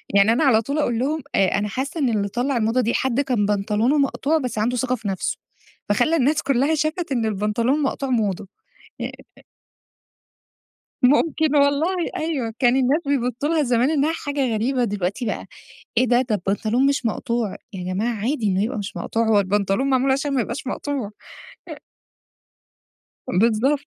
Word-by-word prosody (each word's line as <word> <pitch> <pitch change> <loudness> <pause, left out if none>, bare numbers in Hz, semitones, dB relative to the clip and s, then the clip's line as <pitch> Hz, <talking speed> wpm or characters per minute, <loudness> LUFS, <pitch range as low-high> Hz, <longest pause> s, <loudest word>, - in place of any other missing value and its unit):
يعني 200 +3 +5
أنا 265 +7 +1
على 230 -5 +4
طول 280 +6 -3
أقول 240 -6 0
لهم: 300 +5 -1
"آآ، 195 - +4
أنا 210 - -1
حاسة 265 - -4
إن 270 -5 +2
اللي 205 -3 0
طلّع 245 +4 -1
الموضة 225 +3 +1
دي 235 - 0
حد 260 -1 0
كان 245 -7 0
بنطلونه 210 +6 +1
مقطوع 285 +2 +1
بس 250 -6 -4
عنده 240 +4 0
ثقة 255 +1 0
في 220 -3 -7
نفسه، 190 -2 -2 0.5
فخلّى 245 +10 +2
الناس 295 +2 +2
كلّها 275 +3 +2
شافت 310 +2 -2
إن 240 -4 0
البنطلون 215 +5 0
المقطوع 275 -2 -2
موضة." 210 -4 -1 0.5
آآ - - -3 1.9
ممكن 300 +3 +3
والله 285 +6 +3 0.2
أيوه، 275 -9 -2
كان 245 +1 +3
الناس 270 +4 +2
بيبصوا 265 0 -1
لها 320 -2 +2
زمان 245 +2 +2
إنها 305 +1 +1
حاجة 280 -7 -2
غريبة، 245 +3 0
دلوقتي 205 +3 -2
بقى - - -3 0.5
إيه 255 - +3
ده؟! 245 +1 +3
ده 240 -4 -1
البنطلون 215 +7 0
مش 275 -3 +1
مقطوع، 230 -1 -2 0.2
يا 185 -3 -6
جماعة 230 +5 -1
عادي 230 +2 -1
إنه 195 0 +1
يبقى 235 +2 -2
مش 200 -1 -6
مقطوع، 230 0 -1
هو 210 -2 +5
البنطلون 200 +6 0
معمول 265 +1 +3
عشان 275 +1 -1
ما 255 - +2
يبقاش 265 - -4
مقطوع. 265 -4 -3 0.6
أ - - -6 1.5
بالضبط. 230 +8 +2
250 Hz, 170 wpm, -22 LUFS, 215-280 Hz, 1.9 s, يعني